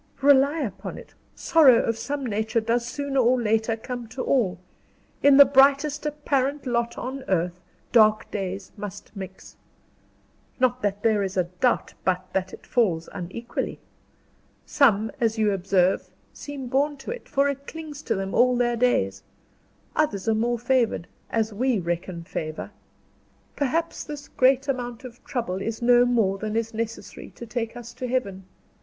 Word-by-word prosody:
"Rely 285 +3 +5
upon 215 -9 -5
it, - - -13 0.2
sorrow 280 -8 +5
of 230 - 0
some 280 +4 -4
nature 220 0 0
does 235 +2 0
sooner 280 +1 -2
or 250 +1 +4
later 225 0 +1
come 245 +1 -6
to 240 +4 -5
all. 225 -10 +1 0.6
In 280 -1 +6
the 285 - +11
brightest 280 +2 +3
apparent 285 -1 -1
lot 235 -1 -1
on 265 +2 -5
earth, 175 -1 0 0.3
dark 215 -2 +4
days 195 -1 -4
must 205 0 -8
mix. 190 -1 -9 1.0
Not 255 0 +2
that 205 0 -2
there 220 -2 +3
is 195 -1 -3
a 185 - +4
doubt 180 +8 0
but 185 0 0
that 185 -1 -1
it - - -12
falls 180 -10 +1
unequally. 200 +5 -5 0.9
Some, 220 -6 +3
as 225 -2 +1
you 215 -1 +2
observe, 190 -1 +1 0.2
seem 285 -2 -7
born 285 +3 +1
to 270 - -7
it, 485 0 -8
for 275 +1 +2
it 280 0 -4
clings 310 -3 -8
to - - -1
them 195 0 -3
all 250 0 +4
their 240 -1 +1
days; 95 - +1 0.7
others 230 -10 0
are 225 - +4
more 235 +2 0
favored 240 -6 +1 0.2
as 220 -1 0
we 250 +3 +1
reckon 175 -1 -3
favor. 155 -3 -5 0.8
Perhaps 325 +4 -1
this 290 -1 -8
great 265 +1 +3
amount 245 -3 -3
of 245 -1 -11
trouble 195 -7 -3
is 225 +2 -3
no 245 0 +5
more 220 -6 +1
than 215 +1 -3
is 225 0 -1
necessary 225 0 -5
to 235 - -8
take 235 0 -4
us 240 -1 -9
to 255 +1 -5
Heaven. 200 -7 -2
235 Hz, 160 wpm, -25 LUFS, 200-265 Hz, 1.0 s, the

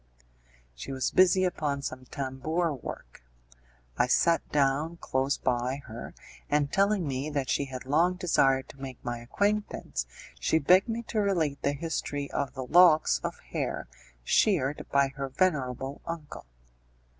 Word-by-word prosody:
She - - -8
was 130 -1 -1
busy 185 0 +5
upon 150 -6 -1
some 130 -2 -5
tambour 145 +6 -2
work; 90 - -9 0.8
I - - +4
sat 165 +6 +3
down 145 +4 +1
close 135 -2 0
by 130 +2 -1
her, 115 +2 -8 0.3
and 145 -1 +1
telling 195 -3 +2
me 135 +2 -2
that 140 -3 -1
she 140 - +1
had 130 -1 -7
long 165 +7 +2
desired 135 -7 +2
to 135 - -13
make 130 -2 -6
my 120 -1 -3
acquaintance, 200 - -1 0.3
she - - +2
begged 180 - +4
me 230 +1 -2
to 220 -1 -2
relate 165 -8 0
the 140 - +1
history 145 -2 -3
of 140 -1 -2
the 130 -1 -4
locks 160 - +5
of - - -3
hair - - -3 0.4
sheared 135 - +2
by 140 -1 +3
her 135 0 -5
venerable 135 -4 -1
uncle. 160 - -7
140 Hz, 145 wpm, -28 LUFS, 130-170 Hz, 0.8 s, busy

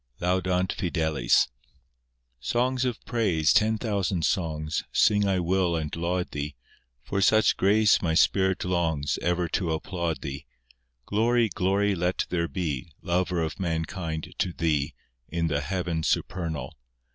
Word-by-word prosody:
III 90 - -2
(Laudant 90 0 +1
fideles) 80 -6 +2 0.9
Songs 125 - 0
of 125 -3 -2
praise, 95 -10 +2
ten 110 +1 +3
thousand 100 -6 -1
songs, 80 -3 -1
Sing 105 -1 +3
I 95 -1 +2
will 90 0 +1
and 75 -2 -3
laud 90 +2 -2
Thee; 75 0 -4 0.5
For 100 +9 -2
such 110 +3 +4
grace 105 +2 +4
my 80 -3 0
spirit 95 +2 +3
longs, 80 -5 0
Ever 90 0 0
to 85 0 -1
applaud 85 -2 -3
Thee. 70 0 -6 0.6
Glory, 115 +2 +2
glory 100 +3 +1
let 90 0 0
there 85 -1 0
be, 80 -6 -3
Lover 90 -1 0
of 80 - -4
mankind 80 -2 -3
to 90 - +1
Thee, 75 -4 -1 0.3
In 85 0 -1
the 70 -1 0
heaven 85 +1 -2
supernal. 80 -5 -2
90 Hz, 135 wpm, -26 LUFS, 80-95 Hz, 0.9 s, such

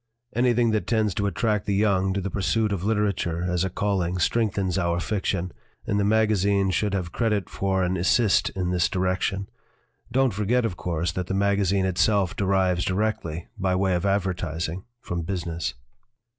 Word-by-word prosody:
Anything 120 -1 +3
that 105 -5 -1
tends 110 -4 +1
to 100 +2 0
attract 105 -2 0
the 100 - +1
young 95 -2 +2
to 100 - 0
the 95 0 -4
pursuit 105 +2 0
of 95 -3 -2
literature 100 -5 0
as 90 0 0
a 95 - 0
calling 95 -2 -1
strengthens 100 -2 0
our 85 0 0
fiction, 90 -1 -2 0.3
and 100 - 0
the - - +2
magazine 100 -2 +2
should 100 +1 0
have 90 -3 -3
credit 105 -4 -1
for 95 -1 0
an 90 +1 0
'assist 95 +3 +3
' - - -33
in 90 -2 -1
this 90 0 +2
direction. 95 +1 -1 0.6
Don't 130 -1 +2
forget, 110 +5 +1
of 95 - -2
course, 85 0 -2
that 90 0 -4
the 95 - -2
magazine 100 -1 +2
itself 95 +1 +2
derives 95 -2 +1
directly, 95 -5 -2
by 95 -1 +1
way 95 0 +1
of 90 0 0
advertising, 90 -3 -1 0.2
from 85 0 -3
business." 85 -6 -3
95 Hz, 170 wpm, -25 LUFS, 90-105 Hz, 0.6 s, Anything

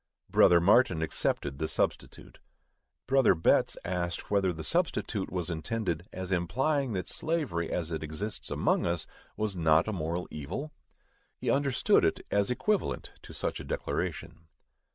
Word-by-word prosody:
Brother 85 -1 +6
Martin 95 -2 +4
accepted 70 -2 -1
the 80 - 0
substitute. - - -3 0.7
Brother 135 -6 +4
Betts 80 - +3
asked 85 0 -3
whether 100 -2 +3
the 80 -2 -6
substitute 115 - -1
was 90 -1 -2
intended 85 0 -3
as 95 0 -5
implying 130 - 0
that 90 -3 -3
slavery, 145 - -2
as 85 -2 -2
it 80 - -3
exists 80 +8 -4
among - - +1
us, 85 -1 -1 0.3
was 105 -2 -1
not 80 0 +3
a 110 - -1
moral 85 0 -3
evil? 105 - -5 0.7
_He - - +1
understood 140 -2 +3
it - - 0
as 100 -1 +2
equivalent 205 +11 -1
to - - -12
such - - -3
a - - -6
declaration. 80 - -4
90 Hz, 145 wpm, -29 LUFS, 80-115 Hz, 0.7 s, Brother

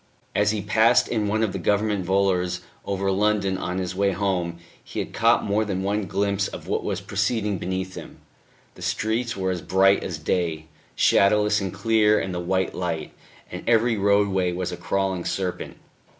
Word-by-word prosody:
As 105 0 +2
he 105 -2 -1
passed 110 +2 +4
in 110 -3 -1
one 110 +2 +1
of 105 -4 -1
the - - -3
Government 105 -1 +1
volors 90 -1 +1 0.2
over 100 0 -1
London 100 -1 +1
on 90 -1 -3
his 90 -1 -2
way 100 0 +1
home, 90 -3 -1 0.3
he - - -10
had - - -3
caught - - +3
more 105 +2 +1
than 95 -3 -3
one 100 0 -1
glimpse 100 +2 0
of - - -9
what - - -1
was - - -2
proceeding 100 -1 -1
beneath 95 +1 -3
him. - - -10 0.6
The - - -15
streets 115 +2 -1
were 95 -1 0
as 90 -2 -3
bright 95 +3 +3
as 85 - -4
day, 80 0 -1 0.3
shadowless 105 +1 +3
and 95 -2 -3
clear 110 -1 +3
in 95 - -3
the 90 - -3
white 95 +1 -1
light, 85 -3 -3 0.4
and - - -6
every 115 0 +3
roadway 100 -2 +2
was 90 0 -3
a - - -4
crawling 95 -2 -1
serpent. 90 -1 -3
100 Hz, 180 wpm, -24 LUFS, 95-105 Hz, 0.6 s, passed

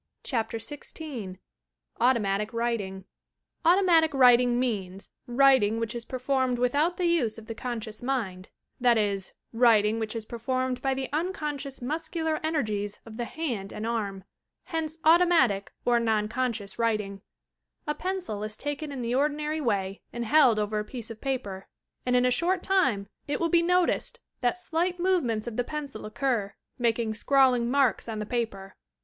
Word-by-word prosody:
CHAPTER 230 -3 -2
XVI 250 - -7 0.6
AUTOMATIC 215 -3 +2
WRITING 215 -5 -2 0.6
i 335 - +6
Automatic 335 -6 +4
writing 245 -2 +6
means 195 -6 -3 0.2
writing 245 -4 +4
which 230 -1 -2
is 235 -1 -6
performed 260 -1 0
without 285 +8 +1
the 360 - 0
use 300 -11 +2
of 225 - -10
the 225 - -5
conscious 225 -2 -5
miad, 220 -8 -2 0.3
that 240 -2 +4
is, 200 -3 -1 0.2
writing 225 -2 +4
which 220 0 -3
is 225 -1 -4
performed 255 +2 -2
by 270 -1 0
the 265 0 -3
unconscious 295 -6 -3
muscular 315 +2 -2
ener 315 -4 0
gies 205 -1 -3
of 225 -1 -10
the 240 - -2
hand 235 -11 -4
and 215 - -5
arm; 205 -5 -2 0.4
hence 320 -1 -3
automatic 320 - +4
or 240 -1 +4
non 220 -2 +1
conscious 230 -3 -3
writing, 210 -4 -1 0.6
A 300 - 0
pencil 365 - -2
is 215 0 -4
taken 290 +1 -4
in 265 -3 -4
the 235 +1 -1
ordinary 300 +3 0
way 200 -6 -1
and 240 0 -4
held 265 -3 +5
over 210 0 0
a - - -2
piece 230 +1 -7
of 220 - -10
paper, 205 -9 -3 0.4
and 250 - +3
in 250 0 +4
a 250 - +3
short 355 +7 +1
time 260 - +2 0.2
it 290 - -1
wilt 335 -1 0
be 340 - +5
noticed 360 +1 +1 0.2
that 245 +6 +1
slight 355 +1 -1
movements 330 - +1
of 235 -2 -5
the 245 - +2
pencil 280 -6 -6
occur, 215 -4 -1 0.2
making 230 -2 +1
scrawling 250 0 +3
marks 270 -3 +2
on 220 - -3
the 210 - -3
paper. 210 -5 -3
245 Hz, 165 wpm, -27 LUFS, 215-290 Hz, 0.6 s, i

